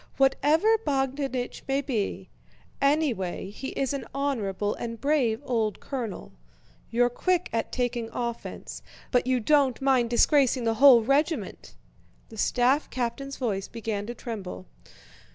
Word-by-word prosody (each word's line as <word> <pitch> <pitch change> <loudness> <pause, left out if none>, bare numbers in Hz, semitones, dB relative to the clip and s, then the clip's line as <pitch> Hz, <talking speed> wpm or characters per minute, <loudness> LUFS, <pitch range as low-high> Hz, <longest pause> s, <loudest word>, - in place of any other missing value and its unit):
Whatever 310 +11 +3
Bogdánich 270 -3 -2
may 270 0 +1
be, 250 -8 -3 0.5
anyway 265 - 0
he 255 +6 -7
is 270 0 -1
an 280 - -4
honorable 210 -8 -1
and 230 -1 -6
brave 275 -7 +1
old 225 -5 -1
colonel! 245 -7 -5 0.6
You're 245 +1 +3
quick 360 +7 0
at 225 -1 -1
taking 245 -2 -2
offense, 235 -1 -5 0.3
but 250 -1 +2
you 255 -1 +2
don't 270 0 +3
mind 260 -3 +2
disgracing 255 +1 +3
the 225 -1 +1
whole 260 -5 +9
regiment!" 275 - -1 0.5
The 220 - -12
staff 255 +7 +2
captain's 255 +3 -3
voice 200 -6 -2
began 215 -3 -4
to 240 - -5
tremble. 200 - -7
250 Hz, 130 wpm, -27 LUFS, 230-275 Hz, 0.6 s, whole